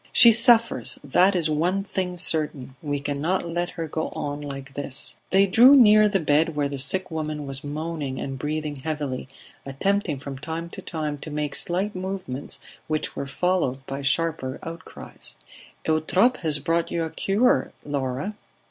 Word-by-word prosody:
"She 235 - +9
suffers, 230 0 +4
that 180 +8 +3
is 170 -3 +1
one 175 +6 0
thing 185 -2 -3
certain; 150 -6 +1
we 145 -2 -2
cannot 145 +6 -2
let 175 +1 -2
her 165 -1 -3
go 160 +1 -3
on 145 0 -4
like 140 -1 -8
this." 140 -1 -5
They 195 +1 +5
drew 240 +8 +7
near 215 -4 +7
the 195 -2 +1
bed 155 0 +2
where 145 -1 0
the 140 -1 -6
sick 185 +7 +2
woman 155 -2 -4
was 135 +1 -6
moaning 150 -2 -4
and 135 -1 -5
breathing 150 +1 -3
heavily, 140 -3 -4 0.4
attempting 165 +4 -1
from 135 -1 -8
time 165 +3 -5
to - - -8
time 155 -3 -4
to 155 - -8
make 150 -1 -3
slight 190 +7 -1
movements 185 -8 -5 0.3
which 155 -1 -2
were 140 - -4
followed 140 -4 -1
by 135 +1 -5
sharper 140 -2 0
outcries. 165 0 -10 0.5
"Eutrope 170 +10 +2
has 155 -3 0
brought 165 +4 -1
you 170 - -1
a 160 - -4
cure, 245 +8 +1
Laura." 140 +5 -3
155 Hz, 165 wpm, -24 LUFS, 145-185 Hz, 0.5 s, She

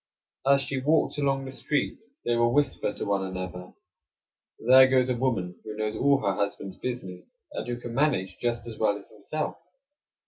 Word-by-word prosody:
As 140 0 +6
she 135 -1 -2
walks 150 +1 +2
along 135 -1 +1
the 130 - -6
street, 145 +2 -1 0.3
they 120 - +2
will 120 0 +3
whisper 145 +3 +1
to - - -5
one 100 -1 +1
another: 90 -1 -6 0.8
"There 130 +2 +7
goes 130 -1 +3
a - - +1
woman 115 -8 -1
who 110 - -6
knows 110 0 -2
all 140 +4 +3
her 100 -2 +1
husband's 100 -1 -3
business; 120 -8 -5 0.3
and 290 - -5
who 120 0 -2
can 120 -1 -7
manage 120 -10 +1
just 120 -1 -1
as 115 -2 -8
well 105 -2 +2
as 100 - -12
himself." 110 +9 -4
120 Hz, 180 wpm, -27 LUFS, 100-135 Hz, 0.8 s, There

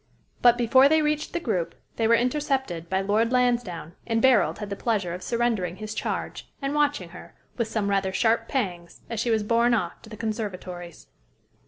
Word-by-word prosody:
But, 240 -1 +6
before 260 +3 +5
they 315 0 +4
reached 300 0 -1
the 345 - -2
group, 185 - -2 0.2
they 225 - +2
were 230 - +6
intercepted 250 - -1
by 190 0 +1
Lord 215 +4 +1
Lansdowne; 240 -10 0
and 225 -1 +1
Barold 215 -11 +4
had 210 -1 -6
the - - -1
pleasure 200 -5 -1
of 180 - -6
surrendering 230 -7 0
his 215 +1 -6
charge, - - -4
and 275 0 -2
watching 290 -12 +1
her, 175 - -12 0.2
with 235 -2 -1
some 220 -2 -1
rather 195 -1 +1
sharp 225 +3 +1
pangs, 180 -10 -3
as 230 - -2
she 235 - 0
was 220 -2 +2
borne 235 +2 +3
off 175 -6 -3
to - - -14
the 215 - -9
conservatories. 185 -6 -5
225 Hz, 190 wpm, -25 LUFS, 190-245 Hz, 0.2 s, But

